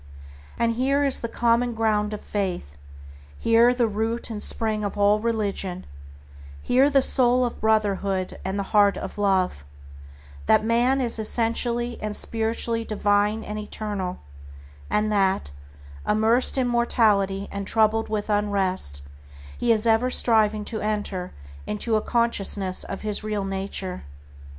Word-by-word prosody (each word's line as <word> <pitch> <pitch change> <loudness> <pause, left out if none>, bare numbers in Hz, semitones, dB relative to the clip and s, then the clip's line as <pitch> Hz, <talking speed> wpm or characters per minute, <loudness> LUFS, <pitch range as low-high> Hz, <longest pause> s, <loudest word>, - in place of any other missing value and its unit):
And 230 0 +1
here 275 +4 +1
is 275 -2 +5
the 230 - -4
common 235 0 +1
ground 215 -2 0
of 210 - -6
faith; 180 - -4 0.6
here 230 +1 +4
the 245 -1 +1
root 225 +3 -3
and 210 -2 -5
spring 215 -2 +2
of 205 0 -4
all 205 +1 +3
religion; 200 -5 -2 0.7
here 260 - +3
the 275 -2 +3
soul 250 -1 +4
of 240 - -6
Brotherhood 200 -3 0
and 190 +2 -3
the 200 - -1
heart 205 -1 +4
of - - -7
Love, 190 - 0 0.8
that 215 0 +4
man 245 +4 +2
is 235 -2 -1
essentially 235 +2 0
and 210 -1 -3
spiritually 230 0 0
divine 210 0 0
and 210 0 -6
eternal, 205 -3 -5 0.7
and 215 0 0
that, 195 - 0 0.6
immersed 225 +5 +2
in 255 -2 +1
mortality 210 -5 +1
and 200 -1 -5
troubled 225 0 +1
with 215 -1 -3
unrest, 195 - -1 0.5
he 240 - 0
is 220 0 +3
ever 230 +2 +3
striving 215 -4 +1
to 220 -1 -4
enter 205 -4 -3 0.4
into 220 +2 -1
a 215 - +1
consciousness 205 -6 +1
of 195 - -6
his 210 0 -3
real 210 -2 -3
nature. 195 -1 -4
215 Hz, 140 wpm, -24 LUFS, 200-230 Hz, 0.8 s, is